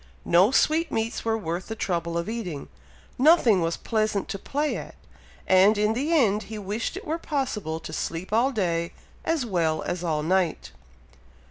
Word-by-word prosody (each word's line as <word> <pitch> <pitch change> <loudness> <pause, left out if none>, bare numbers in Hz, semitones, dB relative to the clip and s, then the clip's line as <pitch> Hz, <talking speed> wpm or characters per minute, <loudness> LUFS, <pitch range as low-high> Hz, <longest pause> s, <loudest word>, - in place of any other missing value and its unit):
No 180 +4 +5
sweetmeats 265 -5 +1
were 225 -1 +1
worth 175 -2 -4
the 225 - -4
trouble 170 -5 -2
of 170 - -2
eating, 205 -11 -5 0.5
nothing 260 - +5
was 165 0 -1
pleasant 215 -3 -1
to 195 - -4
play 295 +8 -1
at, - - -7 0.5
and 190 +3 +5
in 210 +1 +2
the 280 +8 -1
end 220 -10 +3
he 220 - -5
wished 210 - -3
it 390 - -8
were 320 +1 -2
possible 220 - -2
to - - -8
sleep 180 +5 -4
all 240 +5 +3
day, 170 -7 -1 0.3
as 320 -6 0
well 165 -7 0
as 175 0 -3
all 155 -3 0
night. 180 0 0
210 Hz, 165 wpm, -25 LUFS, 170-245 Hz, 0.5 s, No